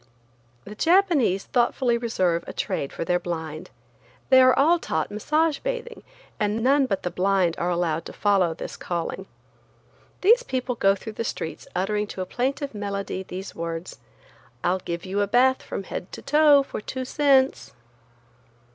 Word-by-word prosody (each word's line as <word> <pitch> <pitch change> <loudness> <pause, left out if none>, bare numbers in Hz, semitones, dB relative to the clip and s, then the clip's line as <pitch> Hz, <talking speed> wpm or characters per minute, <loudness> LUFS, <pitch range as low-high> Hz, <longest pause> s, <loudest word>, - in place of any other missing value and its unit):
The 210 - -8
Japanese 320 - +3
thoughtfully 240 0 +1
reserve 185 -8 0
a - - -6
trade 140 - -3
for - - -5
their 180 +1 +1
blind. 160 -1 -5 0.6
They 260 0 +8
are 255 0 +5
all 330 +5 +4
taught 160 - -2
massage 300 +8 +1
bathing, 485 -1 -5 0.4
and 210 +1 0
none 275 +1 +4
but 195 - -2
the 180 - -2
blind 185 -2 +2
are 175 - 0
allowed 170 -2 -1
to - - -8
follow 190 -5 +2
this - - -7
calling. 175 +2 -4 0.9
These 460 +6 +6
people 255 - -2
go 195 -4 +3
through 215 +3 -8
the 230 - -3
streets 165 -7 -5
uttering 210 +3 0
to 190 - -6
a - - -2
plaintive 270 +6 -2
melody 200 -2 -4
these 190 +1 -7
words: 165 +1 -6 0.6
"I'll 180 +2 +1
give 170 -1 -5
you 195 +2 -1
a 205 - +1
bath 255 +4 +3
from - - -5
head 180 - -6
to - - -8
toe 295 -1 +5
for 270 - -6
two 260 +4 -5
cents." 265 - +2
210 Hz, 165 wpm, -24 LUFS, 180-265 Hz, 0.9 s, They